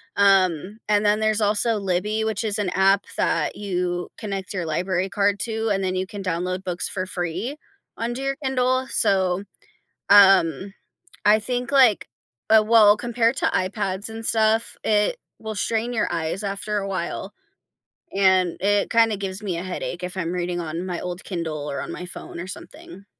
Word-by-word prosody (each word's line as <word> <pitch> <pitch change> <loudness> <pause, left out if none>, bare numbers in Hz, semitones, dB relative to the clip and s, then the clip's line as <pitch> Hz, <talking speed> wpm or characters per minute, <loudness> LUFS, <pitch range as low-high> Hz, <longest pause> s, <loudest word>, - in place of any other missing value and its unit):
um, 195 -1 +3
and 210 0 +2
then 210 +1 +3
there's 215 0 +1
also 210 +2 +2
Libby, 205 +3 -1
which 220 +1 -2
is 210 -1 -1
an 200 - 0
app 195 +1 +3
that - - 0
you 180 -3 -2
connect 195 -3 -5
your 180 -3 -2
library 185 +4 -1
card 200 0 +1
to, 225 -1 -2
and 195 -1 0
then 185 0 -1
you 185 0 -2
can 200 0 -7
download 185 +1 -2
books 180 -2 -3
for 185 -2 -3
free 185 - -4 0.4
under 240 +3 -3
your 275 0 -1
Kindle, 255 0 +1
so, 190 -1 +1 0.7
um, 195 -2 +6 0.5
I 210 +1 +6
think, 245 +2 -3
like, 255 -7 +4 0.4
uh, 220 -1 +7
well, 215 -2 +6
compared 235 +2 0
to 335 - +1
iPads 190 -1 -2
and 225 0 -7
stuff, 220 0 +2
it 215 - +2 0.2
will 220 -1 -5
strain 230 +3 -1
your 220 - 0
eyes 165 +4 -2
after 205 +1 -2
a 195 - -3
while, 190 +1 -4 0.8
and 190 -3 +3
it 205 0 +2
kinda 225 -3 +3
gives 195 +1 -5
me 185 -4 -2
a 170 - -4
headache 180 -1 -5
if 180 +1 -5
I'm 170 -2 -2
reading 175 0 -2
on 165 +3 -4
my 180 -2 -3
old 180 +1 -5
Kindle, 160 -5 -4
or 140 - -3
on - - -6
my 180 - -6
phone, 175 - -9
or 175 - -6
something. 185 +1 -11
195 Hz, 175 wpm, -23 LUFS, 185-220 Hz, 0.8 s, uh